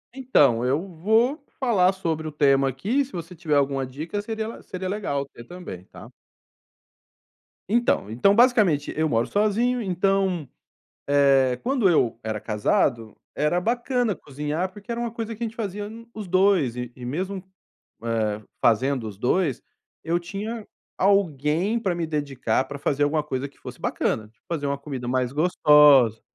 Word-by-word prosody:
Então, 145 Hz, -, +3 dB
eu 130 Hz, +4 st, +1 dB
vou 220 Hz, -, +1 dB, 0.2 s
falar 205 Hz, -8 st, +3 dB
sobre 165 Hz, -5 st, -3 dB
o -, -, -5 dB
tema 140 Hz, -2 st, +3 dB
aqui. 215 Hz, -, 0 dB
Se 275 Hz, -, -12 dB
você 175 Hz, -1 st, -7 dB
tiver 160 Hz, -3 st, -1 dB
alguma 140 Hz, -1 st, +1 dB
dica 155 Hz, +10 st, -5 dB
seria 220 Hz, 0 st, -4 dB
le 230 Hz, -, -8 dB
seria 185 Hz, 0 st, -5 dB
legal 185 Hz, -9 st, -2 dB
ter 120 Hz, -3 st, -13 dB
também, 120 Hz, -, -9 dB
tá? -, -, -13 dB, 1.6 s
Então, 235 Hz, -, +1 dB
então, 200 Hz, -, +3 dB
basicamente 215 Hz, -, +3 dB
eu 160 Hz, +1 st, +1 dB
moro 115 Hz, -5 st, +1 dB
sozinho, 225 Hz, +4 st, +1 dB
então, 190 Hz, -, 0 dB, 0.6 s
eh, 135 Hz, -3 st, +4 dB
quando 255 Hz, -6 st, +2 dB
eu 125 Hz, -10 st, +2 dB
era 110 Hz, -1 st, -3 dB
casado, 110 Hz, +1 st, 0 dB, 0.2 s
era 150 Hz, +5 st, +1 dB
bacana 240 Hz, +1 st, 0 dB
cozinhar, 150 Hz, +6 st, -4 dB
porque 205 Hz, +4 st, -12 dB
era 235 Hz, -, -2 dB
uma 240 Hz, -1 st, -2 dB
coisa 230 Hz, 0 st, -5 dB
que 235 Hz, -, -9 dB
a -, -, +1 dB
gente 225 Hz, 0 st, -8 dB
fazia 205 Hz, -2 st, -4 dB
no 230 Hz, +1 st, -12 dB
os 215 Hz, -2 st, -6 dB
2, 185 Hz, -9 st, +3 dB
e 125 Hz, -1 st, -5 dB
e 125 Hz, -, -9 dB
mesmo, 185 Hz, +8 st, -3 dB, 0.6 s
eh, 110 Hz, -2 st, -1 dB, 0.2 s
fazendo 120 Hz, +1 st, +2 dB
os 100 Hz, -2 st, -10 dB
2, 135 Hz, -, +1 dB, 0.4 s
eu 170 Hz, +1 st, +1 dB
tinha 210 Hz, +5 st, -5 dB, 0.3 s
alguém 185 Hz, -, +2 dB
para 195 Hz, -6 st, -1 dB
me 170 Hz, -1 st, -2 dB
dedicar, 140 Hz, -6 st, -1 dB
pra 140 Hz, +1 st, -7 dB
fazer 145 Hz, 0 st, 0 dB
alguma 150 Hz, +1 st, +2 dB
coisa 140 Hz, -2 st, -3 dB
que 140 Hz, -, -27 dB
fosse -, -, -10 dB
bacana, 110 Hz, -1 st, -1 dB
tipo, 110 Hz, 0 st, -34 dB
fazer 155 Hz, -4 st, -2 dB
uma 140 Hz, 0 st, -1 dB
comida 135 Hz, -4 st, -6 dB
mais 125 Hz, 0 st, 0 dB
gostosa, 150 Hz, -7 st, +5 dB
160 Hz, 165 wpm, -24 LUFS, 135-205 Hz, 1.6 s, gostosa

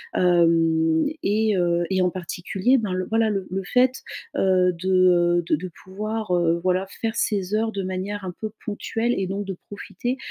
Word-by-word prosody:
Hem 165 Hz, -2 st, +3 dB, 0.2 s
et 215 Hz, +1 st, +1 dB
heu 175 Hz, -1 st, +1 dB
et 190 Hz, -1 st, +1 dB
en 180 Hz, -, +3 dB
particulier, 185 Hz, +7 st, 0 dB
ben, 210 Hz, -5 st, -2 dB
le 185 Hz, 0 st, -2 dB
voilà, 225 Hz, 0 st, +1 dB
le 195 Hz, -3 st, -2 dB
le 190 Hz, +1 st, -3 dB
fait, 255 Hz, +6 st, +2 dB, 0.4 s
heu, 185 Hz, -1 st, +3 dB
de, 180 Hz, +2 st, -4 dB
heu, 175 Hz, -1 st, +4 dB
de -, -, +3 dB
de 185 Hz, +2 st, -6 dB, 0.2 s
pouvoir, 215 Hz, +2 st, -4 dB
heu, 170 Hz, -1 st, +2 dB
voilà 185 Hz, +1 st, +1 dB, 0.2 s
faire 225 Hz, 0 st, -1 dB
ses 205 Hz, -1 st, 0 dB
heures 220 Hz, +1 st, 0 dB
de 195 Hz, -2 st, -3 dB
manière 190 Hz, +2 st, -4 dB
un 180 Hz, -, -3 dB
peu 215 Hz, -, -2 dB, 0.2 s
ponctuelle 225 Hz, +3 st, -1 dB
et 190 Hz, -, -1 dB
donc 200 Hz, +2 st, -3 dB
de 195 Hz, -1 st, -4 dB
profiter, 245 Hz, +5 st, -4 dB
190 Hz, 185 wpm, -23 LUFS, 180-215 Hz, 0.4 s, heu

